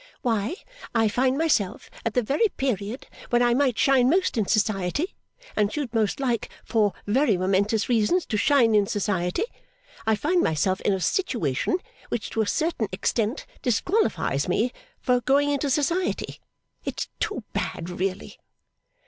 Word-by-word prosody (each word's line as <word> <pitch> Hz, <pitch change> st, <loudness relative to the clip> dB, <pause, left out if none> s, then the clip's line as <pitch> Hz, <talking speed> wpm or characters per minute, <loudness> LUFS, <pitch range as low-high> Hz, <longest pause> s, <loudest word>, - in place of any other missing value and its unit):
Why, 225 Hz, -, 0 dB, 0.4 s
I 225 Hz, -1 st, +4 dB
find 255 Hz, +5 st, +1 dB
myself 290 Hz, -, +1 dB, 0.2 s
at 230 Hz, -2 st, -2 dB
the 250 Hz, -, +3 dB
very 285 Hz, -, +2 dB
period 235 Hz, -2 st, -2 dB, 0.2 s
when 240 Hz, 0 st, +3 dB
I 240 Hz, 0 st, +4 dB
might 255 Hz, -2 st, +2 dB
shine 260 Hz, -2 st, +4 dB
most 370 Hz, +5 st, +2 dB
in 215 Hz, -4 st, 0 dB
society, 215 Hz, -, 0 dB, 0.4 s
and 210 Hz, -1 st, +2 dB
should 275 Hz, -4 st, -3 dB
most 220 Hz, 0 st, +1 dB
like 245 Hz, -4 st, -1 dB, 0.2 s
for 210 Hz, -4 st, +2 dB
very 225 Hz, -1 st, +3 dB
momentous 200 Hz, +4 st, +1 dB
reasons 245 Hz, +10 st, +2 dB
to 220 Hz, -, -3 dB
shine 235 Hz, 0 st, +4 dB
in 205 Hz, -2 st, +4 dB
society 195 Hz, -, 0 dB, 0.6 s
I 220 Hz, -, +4 dB
find 345 Hz, -, +1 dB
myself 185 Hz, -, +1 dB
in 205 Hz, -, +2 dB
a 190 Hz, -, -1 dB
situation 230 Hz, -, 0 dB, 0.3 s
which 230 Hz, -, -3 dB
to 225 Hz, -, 0 dB
a 215 Hz, -, 0 dB
certain 310 Hz, -7 st, 0 dB
extent 220 Hz, +6 st, -1 dB, 0.2 s
disqualifies 230 Hz, -, +1 dB
me 220 Hz, +7 st, +1 dB, 0.3 s
for 250 Hz, -1 st, +2 dB
going 285 Hz, +3 st, +3 dB
into 285 Hz, 0 st, 0 dB
society. 320 Hz, +7 st, 0 dB, 0.4 s
It's -, -, -3 dB
too -, -, -2 dB
bad, 165 Hz, -, -3 dB
really! 185 Hz, +2 st, -3 dB
230 Hz, 150 wpm, -25 LUFS, 205-275 Hz, 0.6 s, I